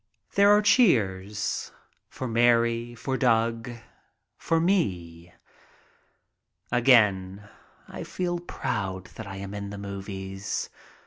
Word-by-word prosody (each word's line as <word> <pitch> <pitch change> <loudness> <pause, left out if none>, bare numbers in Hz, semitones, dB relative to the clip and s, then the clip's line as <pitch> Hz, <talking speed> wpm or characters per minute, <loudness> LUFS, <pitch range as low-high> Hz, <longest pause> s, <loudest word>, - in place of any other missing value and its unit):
There 200 0 +5
are 210 +1 +5
cheers 105 - +2 0.2
— - - -44
for 130 - -5
Mary, 120 0 +2
for 130 +3 -3
Doug, 115 -1 +1 0.7
for 165 - +1
me. 90 - -1 1.4
Again 105 -6 +3 0.4
I - - -7
feel 175 -1 -3
proud 95 - -4
that 110 - -8
I 95 - -7
am 100 0 -7
in 100 -1 -5
the 100 - -7
movies. 95 0 -5
110 Hz, 110 wpm, -26 LUFS, 95-125 Hz, 1.4 s, There